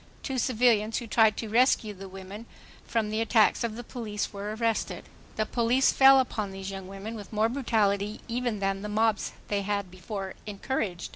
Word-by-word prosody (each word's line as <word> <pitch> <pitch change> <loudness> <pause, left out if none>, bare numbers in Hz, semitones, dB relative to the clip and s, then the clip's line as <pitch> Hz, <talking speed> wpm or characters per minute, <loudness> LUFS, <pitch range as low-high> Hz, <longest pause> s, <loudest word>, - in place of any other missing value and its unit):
Two 265 -1 -2
civilians 225 -3 +2
who 240 - -4
tried 220 -1 +3
to 225 - -4
rescue 225 -1 +3
the 195 0 -10
women 195 +4 -9 0.4
from 220 -2 0
the 215 +1 0
attacks 225 -1 +3
of 225 -2 -2
the 240 - -7
police 215 -4 -4
were 205 +1 -4
arrested. 230 -1 -1 0.3
The 215 - 0
police 240 +4 +2
fell 270 0 +7
upon 215 -5 -1
these 195 0 -6
young 190 -1 -7
women 195 +3 -7
with 210 -3 -9
more 220 +1 +2
brutality 215 -5 0
even 240 -2 -1
than 195 0 0
the 210 - -5
mobs 220 0 +1 0.2
they 205 -1 0
had 200 -2 -2
before 190 +1 -6
encouraged. 200 -3 -3
215 Hz, 185 wpm, -28 LUFS, 200-230 Hz, 0.4 s, fell